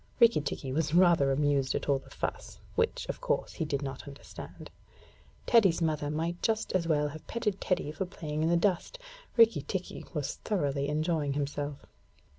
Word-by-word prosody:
Rikki 235 -9 +6
tikki 140 -2 -4
was 160 +1 0
rather 170 -6 +5
amused 140 -1 +1
at - - -2
all 140 -2 +3
the - - -17
fuss, - - -5 0.2
which, 465 +2 0
of - - -5
course, - - -1
he 160 - -2
did 145 -1 -2
not 135 0 -6
understand. 140 0 -10 0.7
Teddy's 200 -8 +5
mother 155 -3 0
might 165 +3 -2
just 220 -1 0
as 175 -3 +1
well 150 -2 +2
have 155 +1 -10
petted 210 -4 -2
Teddy 180 -5 0
for 180 +4 -3
playing 155 -4 -4
in 160 - +2
the 170 - +4
dust. 190 - 0 0.4
Rikki 230 0 +6 0.5
was 150 -2 -2
thoroughly 140 -8 -1
enjoying 155 -1 0
himself. 145 0 -3
155 Hz, 170 wpm, -30 LUFS, 145-185 Hz, 0.7 s, Rikki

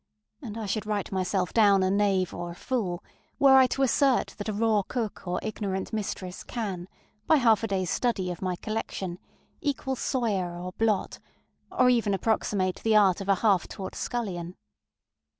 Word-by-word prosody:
ŌĆØ 260 - -7
And 215 0 -6
I 225 - -4
should 210 +2 -2
write 210 -2 -2
myself 185 -1 -1
down 200 -4 +5
a 185 - +2
knave 195 -3 +1
or 175 0 -5
a 170 - -8
fool, 195 -6 -2 0.3
were 275 -2 +6
I 260 -1 +7
to 270 +2 0
assert 270 +1 +2
that 205 - -4
a - - -1
raw 215 0 +2
cook 215 -2 -4
or 180 0 -1
ignorant 200 -2 -3
mistress 190 -4 -4
can, 195 -7 -4 0.4
by 320 - +6
half 230 -6 +4
a - - 0
dayŌĆÖs 190 -3 -1
study 195 -7 0
of 175 - -7
my 185 -1 -1
collection, 190 -3 -4 0.4
equal 275 -2 -1
Soyer 205 -10 -1
or 180 +1 -5
Blot, 215 0 0 0.5
or 255 - +3
even 225 -5 +2
approximate 190 -2 0
the 225 -1 +2
art 195 -3 +4
of 195 - -6
a 195 - +5
half 195 -5 +3
taught 190 - -7
scullion. 185 -8 -4
205 Hz, 180 wpm, -27 LUFS, 185-225 Hz, 0.5 s, I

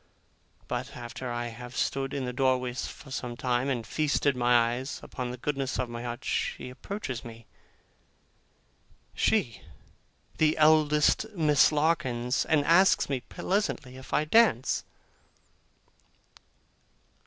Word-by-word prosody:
But 125 +2 -4
after 120 +1 -6
I 120 0 -3
have 120 +1 -9
stood 135 0 -1
in 135 -2 -3
the 125 - -4
doorway 130 -1 +1
for 135 +3 -7
some 125 -2 -4
time, 125 +1 0
and 120 -4 -2
feasted 145 +1 +1
my 120 -1 +3
eyes 130 +3 -5
upon 125 -1 -5
the 125 - -6
goddess 135 -2 -2
of 125 -2 -2
my 120 0 -6
heart, 120 +1 -6
she 125 - -2
approaches 130 - -6
me 115 -1 -11 1.7
she, - - +1 0.8
the 155 -1 +3
eldest 155 +4 +4
Miss 150 -5 +4
Larkins! 135 -5 0
and 150 -3 +2
asks 185 0 +4
me 135 -2 0
pleasantly, 145 - -2
if 130 0 -12
I 150 - +2
dance? 155 - +3
130 Hz, 125 wpm, -28 LUFS, 120-150 Hz, 1.7 s, eldest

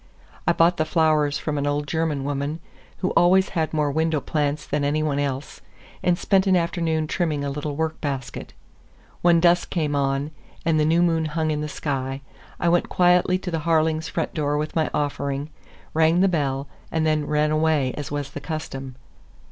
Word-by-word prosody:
I - - +5
bought 170 +2 +3
the 155 - +1
flowers 155 -3 +2
from 150 -2 -2
an 145 - -1
old 145 0 0
German 160 -3 -1
woman 145 +3 -2 0.5
who - - +1
always 185 +3 +4
had 160 -3 -1
more 150 -2 +1
window 160 +1 +1
plants 145 0 -1
than 145 0 -1
any 150 +2 +1
one 145 -2 0
else, 140 -1 -3 0.4
and 180 -1 +2
spent 195 +1 +2
an 190 - +4
afternoon 165 -2 0
trimming 155 -3 -1
a 140 - -2
little 145 +1 -4
work 160 +1 -2
basket. 135 -4 -4 0.7
When 170 -1 +5
dusk 175 +1 +3
came 150 -4 -1
on, 140 +1 0 0.3
and 160 -1 +3
the 150 - +3
new 165 +3 +3
moon 165 -2 +2
hung 155 0 -1
in 150 0 -1
the 150 - -3
sky, 135 -2 -3 0.4
I - - 0
went 175 +1 +2
quietly 180 0 +3
to 185 -1 -6
the 165 - -1
Harlings' 160 0 +1
front - - -2
door 145 -2 0
with 155 +1 -3
my 160 -1 +1
offering, 140 0 -2 0.4
rang 160 +2 +3
the 195 - +5
bell, 140 -5 -1 0.2
and 160 -1 0
then 155 -1 +1
ran 150 0 +1
away 155 -4 +2
as 145 - -5
was 145 -1 -4
the - - -7
custom. 135 -5 -5
155 Hz, 190 wpm, -23 LUFS, 145-165 Hz, 0.7 s, I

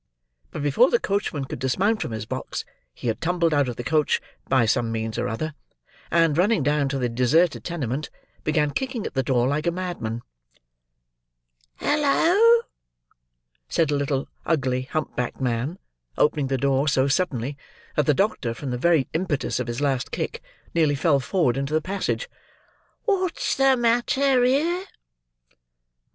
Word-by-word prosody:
But, 150 - -5
before 150 - +4
the 235 - +3
coachman 195 -8 -1
could - - -7
dismount 195 - +1
from - - -2
his 110 -1 -5
box, - - -5 0.3
he - - -12
had 115 - -1
tumbled 170 -1 +1
out 145 -3 +2
of 120 - -4
the 120 - -5
coach, 150 +2 +2 0.3
by 130 -4 +4
some 115 +1 +1
means 110 -1 -3
or - - 0
other; 155 +8 -3 0.6
and, 165 -3 +3
running 195 -3 +3
down 145 0 +1
to 135 - -2
the 125 -2 0
deserted 130 +8 +2
tenement, 150 -4 -3 0.3
began 150 -1 +1
kicking 260 -4 -3
at - - -5
the 135 - +1
door 125 -1 +1
like 150 +4 -1
a - - +3
madman. 170 -11 -4 1.5
"Halloa?" 360 +11 +4 1.1
said 160 -3 +1
a - - +2
little 140 -1 -1 0.2
ugly 130 -4 0
hump 155 -1 -3
backed 125 -1 -3
man: 130 +6 -1 0.4
opening 150 -2 +2
the 135 0 0
door 135 +2 +1
so 135 -1 +3
suddenly, 140 -4 0 0.4
that 150 - +1
the 150 - +4
doctor, 140 - 0
from 135 +1 -5
the 125 - -2
very 165 -2 +3
impetus 160 -4 -1
of - - -3
his 120 +3 -3
last 135 -3 0
kick, - - -4 0.3
nearly 155 -4 +3
fell 140 0 +3
forward 135 -2 +1
into 140 +3 -1
the - - +4
passage. 195 - -2 0.8
"What's 375 -5 0
the 270 -1 +4
matter 245 +2 +2
here?" 325 +9 +1
150 Hz, 160 wpm, -24 LUFS, 130-185 Hz, 1.5 s, before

